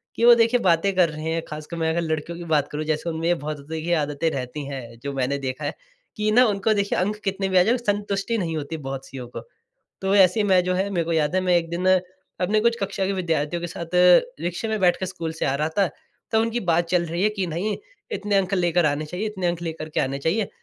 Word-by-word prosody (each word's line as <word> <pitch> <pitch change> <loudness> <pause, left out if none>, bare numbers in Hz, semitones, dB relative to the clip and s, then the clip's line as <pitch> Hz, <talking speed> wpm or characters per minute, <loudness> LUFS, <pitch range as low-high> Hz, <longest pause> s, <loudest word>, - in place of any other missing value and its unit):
कि 230 - +2
वो 240 0 +9
देखिए 235 +2 +3
बातें 185 0 +2
कर 180 -2 +4
रहे 155 +1 -5
हैं, 165 - -1
ख़ासकर 155 +2 -7
मैं 160 -1 0
अगर 165 +1 0
लड़कियों 160 +1 -3
की 175 - -7
बात 150 -3 +2
करूँ 150 +1 -3
जैसे 155 +2 -1
उनमें 165 0 -2
ये 175 - +4
बहुत 150 -1 -5
देखिए 160 +2 -2
आदतें 150 +1 0
रहती 135 +2 -4
हैं 120 -4 -7
जो 140 0 -3
मैंने 135 +1 0
देखा 135 +2 -4
है - - -2 0.4
कि 215 0 0
ना 250 +3 +6
उनको 210 0 +1
देखिए 200 -1 0
अंक 205 +3 0
कितने 195 -1 -1
भी 185 - +2
आ - - +6
जाएँ 235 +6 +2
संतुष्टि 205 0 -1
नहीं 165 -5 -2
होती 155 +2 -4
बहुत 135 -2 -6
सियों 130 -2 -8
को। 120 - -8 0.6
तो 195 +1 +1
ऐसे 195 +2 +5
मैं 185 -3 +4
जो 185 0 0
है 190 +2 0
मेरे 175 -4 0
को 165 - -2
याद 155 0 +1
है 185 - +3
मैं 180 -1 +3
1 165 -1 0
दिन 175 +2 -2 0.5
अपने 210 +4 +2
कुछ 235 +1 +2
कक्षा 195 0 -1
के 200 - 0
विद्यार्थियों 170 -3 -1
के 175 - -3
साथ 170 0 -7 0.5
रिक्शे 175 +6 -3
में 220 - 0
बैठ 180 -1 +4
के 185 - -1
स्कूल 165 -3 -5
से 160 - -3
आ 135 - +1
रहा 155 +2 0
था। 195 - +5 0.5
तब 220 - +4
उनकी 230 +1 0
बात 170 -1 +1
चल 175 0 +2
रही 170 +3 -2
है 210 - +5
कि 190 - 0
नहीं 175 +6 -2 0.4
इतने 205 - 0
अंक 190 0 +1
लेकर 175 -2 +2
आने 145 +1 0
चाहिए, 180 +7 -4
इतने 195 -4 -3
अंक 175 0 -1
लेकर 160 -2 -5
के 155 - -1
आने 135 +1 -1
चाहिए। 190 +8 0
175 Hz, 255 wpm, -24 LUFS, 155-195 Hz, 0.6 s, वो